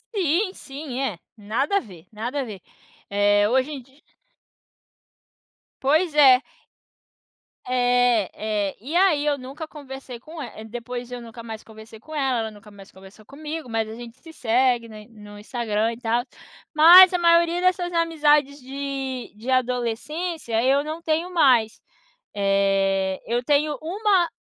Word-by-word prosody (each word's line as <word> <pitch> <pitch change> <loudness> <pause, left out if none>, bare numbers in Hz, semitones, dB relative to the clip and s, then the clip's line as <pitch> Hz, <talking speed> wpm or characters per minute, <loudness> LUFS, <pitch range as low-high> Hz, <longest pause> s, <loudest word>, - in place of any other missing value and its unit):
Sim, 370 +2 +1
sim, 270 -2 -7
é. 210 -11 -3 0.2
Nada 230 - -1
a - - +3
ver, 180 -8 -14
nada 240 +6 -4
a - - -2
ver, 210 -6 -9 0.5
eh, 205 +1 +3
hoje 260 +4 +1
em 275 -3 -6
dia 265 +4 -24 1.8
Pois 310 +4 +2
é. 265 -3 +7 1.3
É, 245 -4 +2
é. 210 -2 -2
E 305 +6 -5
aí 350 -6 +3
eu 290 -1 +1
nunca 275 +5 -8
conversei 270 -5 -10
com 310 +4 -10
el 220 -3 -9
depois 245 +1 -7
eu 245 -1 -6
nunca 230 0 -10
mais 225 -1 -8
conversei 220 0 -14
com 310 +7 -13
ela, 270 -4 0
ela 220 -1 -3
nunca 210 0 -15
mais 200 -1 -15
conversou 195 +3 -16
comigo, 300 +1 -7
mas 225 -1 -2
a 220 - -8
gente 240 +1 -11
se 325 +4 -14
segue, 245 -1 +1
né, 215 -1 -11
no 210 -2 -13
Instagram 225 0 -2
e - - -10
tal. 235 0 0 0.5
Mas 355 +4 +9
a - - +2
maioria 340 0 +3
dessas 365 -1 +1
amizades 300 -4 +2
de 270 -1 -5
de 230 +5 -8
adolescência 250 +2 -1
eu 275 +2 +3
não 315 +2 -6
tenho 330 +3 -1
mais. 250 -9 +3 0.5
Eh, 195 -1 +1
eu 240 +2 -1
tenho 295 +2 +1
1 375 +1 +1
255 Hz, 150 wpm, -23 LUFS, 220-305 Hz, 1.8 s, Mas